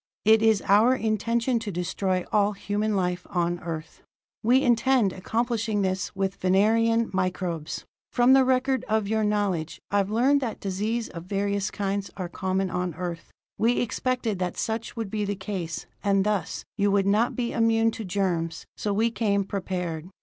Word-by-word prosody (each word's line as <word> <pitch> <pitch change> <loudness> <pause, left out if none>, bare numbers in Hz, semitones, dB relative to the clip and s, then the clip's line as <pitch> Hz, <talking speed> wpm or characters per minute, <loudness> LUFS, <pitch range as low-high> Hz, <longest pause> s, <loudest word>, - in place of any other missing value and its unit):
It 220 0 +6
is 220 -3 +3
our 220 +6 +5
intention 230 +2 0
to 220 -2 -5
destroy 185 +1 -1
all 210 0 +3
human 205 +1 -1
life 180 -1 -1
on 175 -2 0
Earth! 165 -2 -7 0.4
"We 250 +5 +4
intend 240 -4 +3
accomplishing 225 +1 -1
this 185 +1 -2
with 195 0 -1
Venerian 225 +5 +3
microbes. 185 -4 -2 0.3
From 245 +1 +5
the 270 0 +6
record 260 +1 +1
of 215 -1 +1
your 220 +1 +1
knowledge, 200 -6 -1
I've 200 -1 +2
learned 260 +6 +3
that 235 -4 -3
diseases 215 +4 -2
of 170 0 -8
various 200 +1 -1
kinds 200 0 -2
are 185 -3 -3
common 190 +1 -1
on 180 -2 -2
Earth. 175 -1 -5 0.3
We 230 +2 +3
expected 240 -2 -1
that 180 -1 -2
such 225 0 -3
would 225 -4 -4
be 215 -1 -1
the 205 0 -2
case, 190 -4 -5 0.2
and 195 -1 +3
thus, 210 -3 -1
you 200 0 +3
would 200 -1 +2
not 210 +4 +2
be 240 -2 -1
immune 225 0 +3
to 220 - -6
germs, 180 -4 -1
so 210 - -2
we 225 +3 +2
came 205 -3 +1
prepared. 180 -4 -4
205 Hz, 165 wpm, -26 LUFS, 185-225 Hz, 0.4 s, It